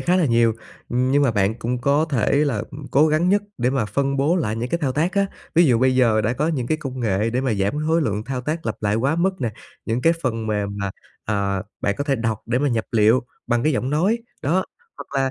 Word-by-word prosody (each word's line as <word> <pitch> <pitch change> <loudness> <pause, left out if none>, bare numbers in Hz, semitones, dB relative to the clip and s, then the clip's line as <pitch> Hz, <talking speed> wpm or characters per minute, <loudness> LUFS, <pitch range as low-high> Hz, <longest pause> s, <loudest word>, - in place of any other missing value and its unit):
khá 180 +1 +2
là 180 -4 +3
nhiều, 115 -2 +3 0.4
ừm, 125 +2 +1
nhưng 145 +1 +3
mà 135 - +3
bạn 105 -1 +1
cũng 120 +2 -3
có 140 +4 +2
thể 120 -6 +1
là, 120 -7 -1
ừm 140 0 -9
cố 150 +4 +5
gắng 155 +4 +2
nhất 205 +2 +3 0.2
để 125 +2 +1
mà 135 -5 0
phân 140 +6 -1
bố 150 +6 +2
lại 110 -10 -1
những 120 +2 -3
cái 170 - -1
thao 140 -6 -1
tác 160 +7 0
á. 200 -1 +2 0.3
Ví 170 +1 +6
dụ 125 -7 +4
bây 130 +1 +3
giờ 115 -4 +3
đã 110 +2 0
có 150 +5 0
những 130 -7 -1
cái 155 - +1
công 135 -4 -6
nghệ 105 0 0
để 125 +2 0
mà 130 -4 0
giảm 100 +2 0
khối 165 +1 +3
lượng 105 -3 -2
thao 130 -1 -3
tác 155 +4 -3
lặp 110 - -1
lại 105 0 +1
quá 135 +8 +1
mức 185 +1 0
nè, 120 -3 -1 0.3
những 115 +2 -1
cái 165 - +5
phần 115 -4 -2
mềm 105 -2 -1
mà, 100 -1 -2 0.3
à, 100 -2 -1 0.2
bạn 100 - 0
có 145 - -1
thể 140 -2 +1
đọc 115 -2 -1
để 120 +2 +1
mà 145 - +1
nhập 115 -3 0
liệu 110 +2 +4 0.3
bằng 120 0 +1
cái 155 - +2
giọng 130 +1 -1
nói, 185 +10 +2 0.2
đó, 175 +7 +1 0.3
hoặc - - -9 0.2
là 130 - -1
130 Hz, 265 wpm, -22 LUFS, 110-150 Hz, 0.4 s, Ví